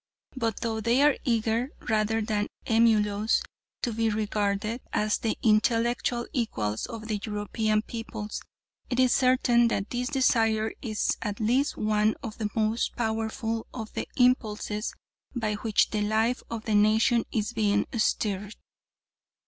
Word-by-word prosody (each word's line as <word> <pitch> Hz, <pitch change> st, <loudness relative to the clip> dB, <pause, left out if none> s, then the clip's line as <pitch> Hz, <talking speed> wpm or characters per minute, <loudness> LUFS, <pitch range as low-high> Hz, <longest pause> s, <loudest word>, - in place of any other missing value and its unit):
But 230 Hz, -4 st, -2 dB
though 220 Hz, -1 st, -2 dB
they 235 Hz, +5 st, +3 dB
are 295 Hz, -1 st, +5 dB
eager, 230 Hz, 0 st, +1 dB, 0.2 s
rather 220 Hz, 0 st, +1 dB
than 210 Hz, -1 st, -1 dB, 0.2 s
emulous, 220 Hz, -1 st, +3 dB, 0.4 s
to 240 Hz, -, 0 dB
be 225 Hz, 0 st, +1 dB
regarded 210 Hz, +1 st, -1 dB
as 210 Hz, 0 st, +1 dB
the 225 Hz, -, -1 dB
intellectual 235 Hz, +2 st, +2 dB
equals 110 Hz, -, -1 dB
of 225 Hz, -2 st, -7 dB
the 215 Hz, -2 st, -1 dB
European 215 Hz, 0 st, -1 dB
peoples, 225 Hz, -2 st, -6 dB, 0.5 s
it 245 Hz, -, -1 dB
is 255 Hz, -1 st, +5 dB
certain 250 Hz, -2 st, +4 dB
that 200 Hz, -3 st, -2 dB
this 245 Hz, +1 st, -1 dB
desire 225 Hz, -5 st, +2 dB
is 215 Hz, -4 st, -1 dB
at 205 Hz, -2 st, -3 dB
least 250 Hz, +6 st, +1 dB
one 215 Hz, 0 st, +2 dB
of 225 Hz, -3 st, -7 dB
the 215 Hz, -2 st, -1 dB
most 220 Hz, +1 st, 0 dB
powerful 225 Hz, 0 st, -2 dB
of 220 Hz, -3 st, -6 dB
the -, -, -3 dB
impulses 220 Hz, -4 st, +1 dB, 0.4 s
by 220 Hz, -3 st, -1 dB
which 210 Hz, +1 st, +1 dB
the 215 Hz, -, 0 dB
life 220 Hz, +4 st, +1 dB
of 225 Hz, -1 st, -5 dB
the 220 Hz, -, -1 dB
nation 220 Hz, +3 st, +4 dB
is 215 Hz, +1 st, -1 dB
being 205 Hz, -2 st, +2 dB
stirred. 210 Hz, -2 st, 0 dB
220 Hz, 140 wpm, -27 LUFS, 210-235 Hz, 0.5 s, are